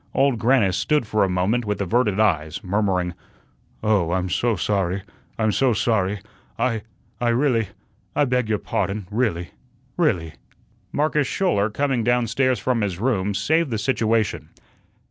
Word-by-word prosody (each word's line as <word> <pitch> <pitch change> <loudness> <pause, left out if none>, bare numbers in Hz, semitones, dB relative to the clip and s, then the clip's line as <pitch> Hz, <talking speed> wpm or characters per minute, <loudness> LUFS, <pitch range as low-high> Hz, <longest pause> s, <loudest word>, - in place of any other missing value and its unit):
Old 135 -4 +3
Grannis 110 -7 +3
stood 150 -5 +1
for 105 -1 +1
a 95 - +1
moment 95 +7 +1
with 105 -1 -2
averted 105 +1 +1
eyes, 80 -8 +1
murmuring: 95 -2 0 0.7
"Oh, 100 -6 +2
I'm 95 0 -1
so 120 +3 +1
sorry, 95 0 -1 0.3
I'm 110 -1 +2
so 130 +2 +2
sorry. 105 -3 0 0.4
I 115 -4 0 0.4
I 120 - +1
really 120 -3 +2 0.5
I 145 - +3
beg 125 -3 0
your 105 - +2
pardon, 100 0 -2
really 105 -7 -1 0.5
really." 90 - +1 0.6
Marcus 150 -1 +1
Schouler, 110 - +1
coming 130 +1 0
down 120 +1 +2
stairs 130 +3 +1
from 125 -3 0
his 100 -4 -1
room, 105 -3 0
saved 160 +7 +1
the 115 - -1
situation. 110 -2 0
110 Hz, 145 wpm, -23 LUFS, 95-125 Hz, 0.7 s, Old